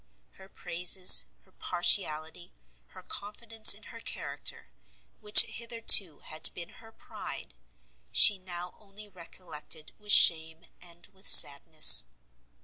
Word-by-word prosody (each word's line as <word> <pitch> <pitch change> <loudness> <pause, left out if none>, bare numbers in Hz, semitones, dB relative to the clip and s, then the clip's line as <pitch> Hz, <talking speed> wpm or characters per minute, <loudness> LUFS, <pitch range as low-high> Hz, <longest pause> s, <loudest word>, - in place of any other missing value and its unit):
Her 190 0 -20
praises, 180 +1 +2 0.2
her - - -32
partiality, 175 -2 -3 0.4
her - - -20
confidence 215 +2 -1
in - - -14
her - - -15
character, - - -7 0.5
which 210 0 +4
hitherto 230 -8 0
had 155 0 -3
been 170 -1 -12
her 225 -1 -22
pride, - - -13 0.6
she 205 -2 +2
now 180 -1 -12
only 210 0 -19
recollected 165 -4 -12
with 210 0 -7
shame 160 -1 +2 0.2
and 175 -1 -15
with 190 +1 -13
sadness. 155 +2 +4
180 Hz, 115 wpm, -24 LUFS, 165-205 Hz, 0.6 s, which